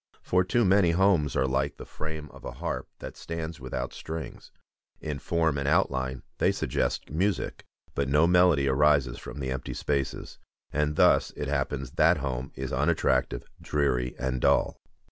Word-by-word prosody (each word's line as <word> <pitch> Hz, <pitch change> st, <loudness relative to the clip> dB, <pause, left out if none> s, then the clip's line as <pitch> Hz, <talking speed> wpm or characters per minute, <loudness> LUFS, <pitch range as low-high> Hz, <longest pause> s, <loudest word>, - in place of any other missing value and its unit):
For 90 Hz, 0 st, +2 dB
too 115 Hz, +5 st, +2 dB
many 95 Hz, -1 st, +4 dB
homes 90 Hz, -6 st, +3 dB
are 65 Hz, -, +2 dB
like 70 Hz, +2 st, -1 dB
the -, -, -9 dB
frame 75 Hz, -1 st, -6 dB
of -, -, -14 dB
a -, -, -6 dB
harp -, -, -4 dB
that -, -, -8 dB
stands 80 Hz, -1 st, -5 dB
without 65 Hz, -1 st, -4 dB
strings. 80 Hz, 0 st, -7 dB, 0.5 s
In 75 Hz, -2 st, -4 dB
form 80 Hz, -2 st, 0 dB
and 70 Hz, -, -2 dB
outline 65 Hz, -6 st, +1 dB, 0.2 s
they -, -, +4 dB
suggest -, -, -2 dB
music, 95 Hz, +6 st, -1 dB, 0.3 s
but 70 Hz, -1 st, -1 dB
no 75 Hz, +3 st, +5 dB
melody 90 Hz, -5 st, +4 dB
arises 70 Hz, -2 st, +3 dB
from 65 Hz, +3 st, -8 dB
the 65 Hz, -1 st, -3 dB
empty 65 Hz, -1 st, -4 dB
spaces; 70 Hz, -2 st, -2 dB, 0.3 s
and 75 Hz, 0 st, 0 dB
thus -, -, +4 dB
it 75 Hz, -, -3 dB
happens 70 Hz, -2 st, -2 dB
that -, -, +4 dB
home 65 Hz, -1 st, -3 dB
is 65 Hz, 0 st, -4 dB
unattractive, 65 Hz, -2 st, +1 dB, 0.2 s
dreary, 65 Hz, -4 st, 0 dB
and 65 Hz, 0 st, -2 dB
dull. -, -, +2 dB
70 Hz, 165 wpm, -27 LUFS, 65-80 Hz, 0.5 s, no